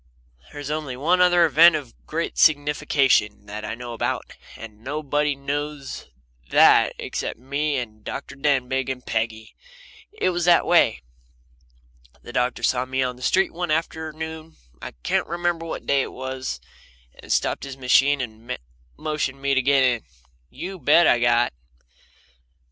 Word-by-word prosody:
There's 145 Hz, 0 st, -6 dB
only 150 Hz, -5 st, -4 dB
one 175 Hz, +7 st, +2 dB
other 175 Hz, -1 st, +5 dB
event 160 Hz, +2 st, +6 dB
of 140 Hz, -6 st, -5 dB
great 165 Hz, +2 st, -3 dB
signification 145 Hz, -8 st, +2 dB
that 105 Hz, +1 st, -7 dB
I 110 Hz, -, -4 dB
know 120 Hz, 0 st, -7 dB
about, 115 Hz, -, -3 dB, 0.2 s
and 110 Hz, -1 st, -11 dB
nobody 145 Hz, +1 st, -1 dB
knows 145 Hz, 0 st, -5 dB, 0.4 s
that -, -, +5 dB
except -, -, -4 dB
me 140 Hz, +3 st, -2 dB
and 110 Hz, -4 st, -6 dB
Dr. 140 Hz, -, -6 dB
Denbigh 135 Hz, -2 st, 0 dB
and 130 Hz, -1 st, -5 dB
Peggy. 110 Hz, -1 st, -3 dB, 0.6 s
It 415 Hz, -, 0 dB
was 175 Hz, -1 st, -1 dB
this 175 Hz, -1 st, +5 dB
way. 165 Hz, -, +3 dB, 1.2 s
The 120 Hz, -, -10 dB
doctor 125 Hz, 0 st, -1 dB
saw 125 Hz, 0 st, +1 dB
me 130 Hz, 0 st, -1 dB
on 125 Hz, -1 st, -2 dB
the 125 Hz, -, -16 dB
street 190 Hz, +8 st, +2 dB
one 175 Hz, 0 st, -3 dB
afternoon 160 Hz, 0 st, -4 dB, 0.3 s
I -, -, -7 dB
can't -, -, 0 dB
remember 170 Hz, -1 st, -2 dB
what -, -, -6 dB
day 140 Hz, -1 st, +2 dB
it -, -, -4 dB
was 130 Hz, -, -5 dB, 0.6 s
and -, -, -9 dB
stopped -, -, 0 dB
his 135 Hz, -1 st, -7 dB
machine 135 Hz, +2 st, +3 dB
and 115 Hz, 0 st, -6 dB, 0.4 s
motioned 150 Hz, -3 st, -2 dB
to -, -, -20 dB
me 140 Hz, 0 st, +2 dB
to 135 Hz, -, +3 dB
get 135 Hz, +1 st, +3 dB
in. 120 Hz, -3 st, +2 dB, 0.5 s
You 185 Hz, +1 st, -7 dB
bet 155 Hz, +4 st, +5 dB
I 120 Hz, -, +4 dB
got. 120 Hz, -, +2 dB
140 Hz, 155 wpm, -23 LUFS, 125-155 Hz, 1.2 s, event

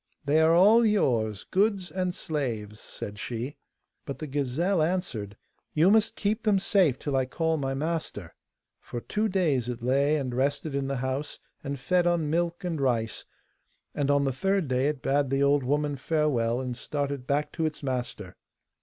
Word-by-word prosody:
'They 150 Hz, +3 st, +4 dB
are 160 Hz, +1 st, +5 dB
all 210 Hz, +7 st, +6 dB
yours, 115 Hz, -, +1 dB
goods 195 Hz, -3 st, +1 dB
and 185 Hz, 0 st, -1 dB
slaves,' 115 Hz, -9 st, -3 dB
said 105 Hz, 0 st, -7 dB
she. 120 Hz, +6 st, -4 dB, 0.5 s
But 140 Hz, -, -6 dB
the 155 Hz, -, -5 dB
gazelle 150 Hz, +6 st, 0 dB
answered, 155 Hz, -, -2 dB, 0.4 s
'You 165 Hz, +5 st, +5 dB
must 220 Hz, 0 st, +3 dB
keep 210 Hz, +2 st, -1 dB
them 210 Hz, -3 st, +3 dB
safe 185 Hz, -, +3 dB
till 145 Hz, -2 st, -3 dB
I 130 Hz, -1 st, +1 dB
call 160 Hz, +5 st, 0 dB
my 135 Hz, -2 st, -2 dB
master.' 150 Hz, -, -3 dB, 0.5 s
For 120 Hz, -, -6 dB
two 210 Hz, -, -1 dB
days 155 Hz, -, +1 dB
it 120 Hz, -1 st, -5 dB
lay 140 Hz, +4 st, +3 dB
and 130 Hz, -4 st, -3 dB
rested 140 Hz, +4 st, -1 dB
in 140 Hz, -1 st, -1 dB
the 135 Hz, -1 st, -2 dB
house, 135 Hz, +3 st, -3 dB, 0.3 s
and 140 Hz, -1 st, -3 dB
fed 175 Hz, +6 st, +2 dB
on 165 Hz, -4 st, +1 dB
milk 170 Hz, +2 st, -1 dB
and 165 Hz, -5 st, -2 dB
rice, 115 Hz, -4 st, 0 dB, 0.7 s
and 145 Hz, -1 st, -1 dB
on 140 Hz, 0 st, +4 dB
the 135 Hz, -1 st, 0 dB
third 195 Hz, +4 st, 0 dB
day 130 Hz, +1 st, +1 dB
it 150 Hz, -3 st, -2 dB
bade 140 Hz, 0 st, +1 dB
the 135 Hz, +1 st, +2 dB
old 140 Hz, 0 st, +4 dB
woman 145 Hz, +2 st, 0 dB
farewell 130 Hz, -6 st, +1 dB
and 125 Hz, -2 st, -3 dB
started 140 Hz, 0 st, -3 dB
back 145 Hz, +1 st, 0 dB
to 160 Hz, -1 st, 0 dB
its 150 Hz, -1 st, -7 dB
master. 125 Hz, -8 st, -4 dB
145 Hz, 180 wpm, -27 LUFS, 130-170 Hz, 0.7 s, all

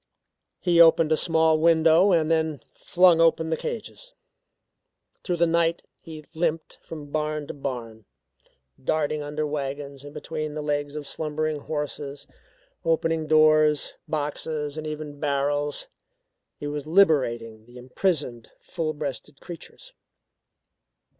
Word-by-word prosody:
He 175 Hz, -2 st, +4 dB
opened 165 Hz, -1 st, +6 dB
a -, -, +5 dB
small 160 Hz, -1 st, +2 dB
window 165 Hz, +3 st, +5 dB
and 165 Hz, -2 st, +2 dB
then 160 Hz, -4 st, 0 dB
flung 175 Hz, -2 st, +4 dB
open 165 Hz, -1 st, +3 dB
the -, -, +2 dB
cages. -, -, -6 dB, 1.1 s
Through 180 Hz, -, -1 dB
the 170 Hz, -, +4 dB
night 170 Hz, 0 st, +1 dB, 0.2 s
he 155 Hz, -2 st, -10 dB
limped 160 Hz, -1 st, -2 dB
from 150 Hz, -3 st, -9 dB
barn 150 Hz, -1 st, -2 dB
to -, -, -7 dB
barn, 120 Hz, -6 st, -6 dB, 0.8 s
darting 150 Hz, +1 st, 0 dB
under 150 Hz, +1 st, -3 dB
wagons, 140 Hz, -1 st, -5 dB
and 145 Hz, -, -10 dB
between 155 Hz, 0 st, -5 dB
the 150 Hz, -, -4 dB
legs 145 Hz, 0 st, -2 dB
of 150 Hz, -2 st, -6 dB
slumbering 155 Hz, -1 st, -2 dB
horses, 145 Hz, -1 st, -5 dB, 0.6 s
opening 165 Hz, -1 st, 0 dB
doors, 155 Hz, -1 st, +4 dB
boxes, 150 Hz, 0 st, -2 dB
and 155 Hz, 0 st, -5 dB
even 150 Hz, -1 st, -6 dB
barrels. 145 Hz, 0 st, -1 dB, 0.7 s
He -, -, -7 dB
was 145 Hz, 0 st, -4 dB
liberating 120 Hz, -, +2 dB
the 120 Hz, +1 st, -14 dB
imprisoned, 130 Hz, -2 st, -2 dB
full 155 Hz, -2 st, -4 dB
breasted 145 Hz, -2 st, -6 dB
creatures. 180 Hz, -, -11 dB
155 Hz, 125 wpm, -25 LUFS, 145-160 Hz, 1.1 s, opened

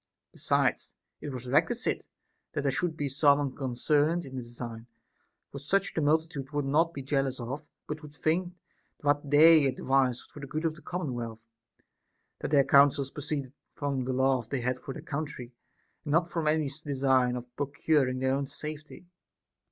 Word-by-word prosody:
Besides, -, -, 0 dB, 0.3 s
it -, -, -5 dB
was 130 Hz, -2 st, -6 dB
requisite 165 Hz, -, +1 dB, 0.5 s
that 145 Hz, -3 st, -2 dB
there 140 Hz, -, +2 dB
should 160 Hz, +3 st, -1 dB
be 145 Hz, -, -1 dB
some 140 Hz, +1 st, +4 dB
unconcerned 145 Hz, +4 st, 0 dB
in 135 Hz, -1 st, -9 dB
the 130 Hz, -, -3 dB
design; 120 Hz, -1 st, -8 dB, 0.6 s
for 140 Hz, -, -6 dB
such 195 Hz, +8 st, 0 dB
the 160 Hz, -, 0 dB
multitude 150 Hz, -2 st, 0 dB
would 145 Hz, -1 st, -1 dB
not 160 Hz, +5 st, +3 dB
be 140 Hz, -5 st, -7 dB
jealous 135 Hz, -1 st, 0 dB
of, 130 Hz, +5 st, -5 dB, 0.2 s
but 155 Hz, +1 st, -5 dB
would 150 Hz, -1 st, -12 dB
think 175 Hz, +4 st, 0 dB, 0.5 s
what' 145 Hz, 0 st, +1 dB
they 155 Hz, 0 st, +7 dB
advised 130 Hz, -1 st, +1 dB
was -, -, -20 dB
for -, -, -11 dB
the 140 Hz, -, -7 dB
good 155 Hz, +4 st, -3 dB
of 160 Hz, -, +1 dB
the 155 Hz, -, -15 dB
commonwealth, 120 Hz, -10 st, -4 dB, 0.9 s
that -, -, -3 dB
their 140 Hz, -2 st, +4 dB
counsels 140 Hz, -1 st, +5 dB
proceeded 140 Hz, -2 st, -4 dB, 0.2 s
from 140 Hz, -3 st, -2 dB
the 130 Hz, +1 st, -2 dB
love 130 Hz, -3 st, +1 dB
they 135 Hz, -3 st, -1 dB
had 125 Hz, +1 st, -1 dB
for -, -, -7 dB
their -, -, -8 dB
country, 140 Hz, -4 st, -5 dB, 0.5 s
and 145 Hz, -, -2 dB
not 165 Hz, +1 st, +3 dB
from 165 Hz, -2 st, -2 dB
any 155 Hz, -1 st, +2 dB, 0.2 s
design 130 Hz, -3 st, +2 dB
of 125 Hz, 0 st, -8 dB
procuring 140 Hz, -1 st, +1 dB
their 130 Hz, +1 st, +1 dB
own 140 Hz, 0 st, -1 dB
safety. 150 Hz, +4 st, -8 dB
140 Hz, 175 wpm, -29 LUFS, 130-155 Hz, 0.9 s, they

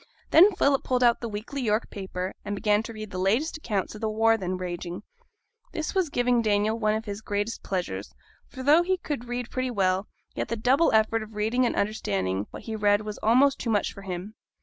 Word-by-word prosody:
Then 375 Hz, +6 st, +8 dB
Philip 280 Hz, -6 st, +2 dB
pulled 250 Hz, -1 st, +1 dB
out 240 Hz, -1 st, +4 dB
the 235 Hz, -, -3 dB
weekly 220 Hz, +7 st, -5 dB
York 220 Hz, -2 st, 0 dB
paper, 190 Hz, -1 st, -4 dB
and 205 Hz, 0 st, -3 dB
began 210 Hz, +1 st, +2 dB
to 225 Hz, -, -7 dB
read 215 Hz, -2 st, -8 dB
the 185 Hz, -, -4 dB
latest 230 Hz, -, +1 dB
accounts 210 Hz, -10 st, -2 dB
of 215 Hz, -, -10 dB
the 220 Hz, -, 0 dB
war 225 Hz, +1 st, +3 dB
then 185 Hz, -3 st, -3 dB
raging. 175 Hz, -1 st, -5 dB, 0.7 s
This 315 Hz, -1 st, -3 dB
was 375 Hz, -5 st, +1 dB
giving 245 Hz, -3 st, +2 dB
Daniel 215 Hz, +1 st, +1 dB
one 215 Hz, -1 st, +2 dB
of 220 Hz, +1 st, -4 dB
his 205 Hz, 0 st, -5 dB
greatest 205 Hz, +2 st, -2 dB
pleasures; 175 Hz, -, -3 dB, 0.4 s
for 260 Hz, -, -8 dB
though 300 Hz, +5 st, +6 dB
he 375 Hz, +2 st, +1 dB
could 290 Hz, -8 st, -4 dB
read 245 Hz, 0 st, -4 dB
pretty 255 Hz, 0 st, -1 dB
well, 195 Hz, -3 st, +1 dB, 0.3 s
yet -, -, -3 dB
the 230 Hz, -, -2 dB
double 260 Hz, +9 st, +3 dB
effort 220 Hz, +1 st, +3 dB
of 215 Hz, 0 st, -9 dB
reading 230 Hz, +4 st, +1 dB
and -, -, -2 dB
understanding 100 Hz, -, -1 dB
what -, -, -10 dB
he 225 Hz, -, -5 dB
read 205 Hz, -1 st, +3 dB
was 210 Hz, -1 st, -6 dB
almost 260 Hz, +5 st, +4 dB
too 235 Hz, -, -3 dB
much 210 Hz, -2 st, +1 dB
for 200 Hz, -, -10 dB
him. 190 Hz, +2 st, -6 dB
220 Hz, 215 wpm, -26 LUFS, 200-245 Hz, 0.7 s, Then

